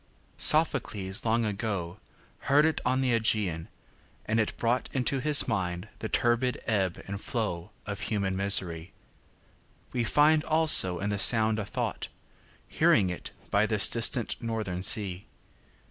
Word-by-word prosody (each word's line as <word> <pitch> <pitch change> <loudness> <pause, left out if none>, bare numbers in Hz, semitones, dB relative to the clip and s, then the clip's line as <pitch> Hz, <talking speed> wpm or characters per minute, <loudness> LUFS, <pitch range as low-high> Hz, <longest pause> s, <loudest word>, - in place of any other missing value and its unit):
Sophocles 115 - +4
long 115 +1 0
agoHeard 105 - -3
it 160 - -1
on 130 +1 0
the 130 -2 0
Ægæan, 105 -8 -1 0.6
and 115 +1 -1
it 110 - -2
broughtInto 125 +2 -2
his 150 +1 +3
mind 95 -3 -4
the 110 - -6
turbid 120 +1 -1
ebb 95 -6 -2
and 100 +1 -6
flowOf 100 -2 -6
human 100 -4 -2
misery; 95 -3 +1 1.0
weFind 150 +6 +2
also 155 - +5
in 100 +4 -4
the 100 - -3
sound 110 +1 +4
a 105 - -4
thought, - - -5 0.6
Hearing 95 -2 +1
it 90 - -8 0.2
by 100 +2 +1
this 105 -2 +4
distant 115 +1 0
northern 110 -6 -5
sea. 95 -1 -1
110 Hz, 125 wpm, -27 LUFS, 95-120 Hz, 1.0 s, also